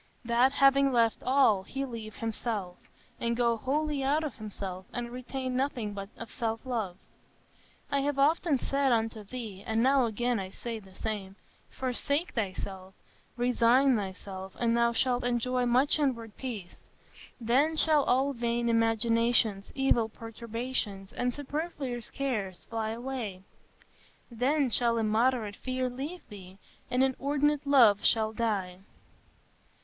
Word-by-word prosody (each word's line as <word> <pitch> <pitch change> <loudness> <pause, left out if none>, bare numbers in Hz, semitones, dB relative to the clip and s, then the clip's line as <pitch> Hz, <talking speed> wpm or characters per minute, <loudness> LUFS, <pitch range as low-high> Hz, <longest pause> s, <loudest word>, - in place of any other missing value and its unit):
That 240 +3 +3
having 275 0 +5
left 230 -2 +2
all, 255 -7 +4
he 270 +8 -4
leave 225 -4 -7
himself, 215 -5 -4 0.3
and 235 0 -1
go 235 -1 +3
wholly 290 +5 -1
out 295 +4 +2
of 295 -5 -5
himself, 195 -3 -6
and 240 -1 -4
retain 255 +1 -4
nothing 250 -6 -1 0.2
of 230 - -8
self 230 -2 -3
love.... 220 -8 -2 0.9
I 280 - +2
have 285 0 -1
often 300 +1 +3
said 275 +1 +1
unto 225 -2 0
thee, 205 -3 -7
and 225 +2 0
now 265 -1 +4
again 240 +1 0
I 190 -1 -5
say 230 +3 -6
the 190 -2 -17
same, 200 -3 -4 0.3
Forsake 280 +6 -2
thyself, 190 -3 -4 0.4
resign 245 +2 +4
thyself, 190 -1 -5
and 235 -1 +2
thou 235 0 +3
shalt 245 +1 +1
enjoy 245 +1 +1
much 260 +6 +3
inward 230 -7 -1
peace.... 220 -9 -6 0.6
Then 265 +7 +2
shall 310 -2 +4
all 270 +3 +2
vain 235 -1 0
imaginations, 230 -2 +2
evil 270 -4 +2
perturbations, 225 -3 -4
and 250 0 0
superfluous 285 -3 -4
cares 210 -10 -3
fly 225 -1 -3
away; 230 -5 -5 0.9
then 260 +3 +1
shall 235 0 +2
immoderate 220 -1 +1
fear 255 -1 -2
leave 290 +8 -6
thee, 190 -2 -12 0.3
and 250 +1 +2
inordinate 285 +2 +1
love 235 -8 +6
shall 220 -1 +3
die." 200 -6 -1
235 Hz, 135 wpm, -29 LUFS, 220-265 Hz, 0.9 s, love